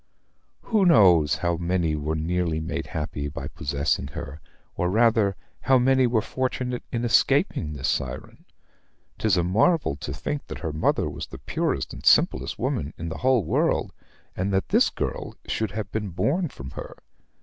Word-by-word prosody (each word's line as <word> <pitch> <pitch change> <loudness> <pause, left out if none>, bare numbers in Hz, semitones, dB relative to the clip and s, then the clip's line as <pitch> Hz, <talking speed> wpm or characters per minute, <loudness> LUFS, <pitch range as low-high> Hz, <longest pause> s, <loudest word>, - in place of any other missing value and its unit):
Who 215 -4 +2
knows 90 - +6
how 85 +1 -1
many 85 -2 0
were 75 +1 -2
nearly 80 0 -1
made 80 +1 -4
happy 75 -2 -4
by 70 - -6
possessing 70 -1 -1
her, 70 +2 -8 0.3
or, 90 - 0
rather, 110 -1 +3 0.3
how 130 0 +4
many 130 0 +4
were 115 -3 +1
fortunate 125 -1 -2
in 120 -1 -1
escaping 120 - +2
this 70 -3 -3
siren? - - -3 0.7
'Tis 105 -4 +2
a 85 - +2
marvel 110 - +2
to 75 - -6
think 140 - -4
that - - -7
her 80 - -3
mother 80 - +1
was - - -6
the - - -10
purest - - -2
and - - -10
simplest - - +3
woman 70 - -2
in 85 0 -5
the 80 - -6
whole 130 -4 +3
world, 80 - 0 0.4
and 95 +2 -1
that 95 0 0
this - - +4
girl - - -4
should 110 -1 -1
have 100 -1 -5
been 105 -2 -3
born 155 - 0
from 65 - -9
her. - - -8
90 Hz, 170 wpm, -25 LUFS, 80-120 Hz, 0.7 s, knows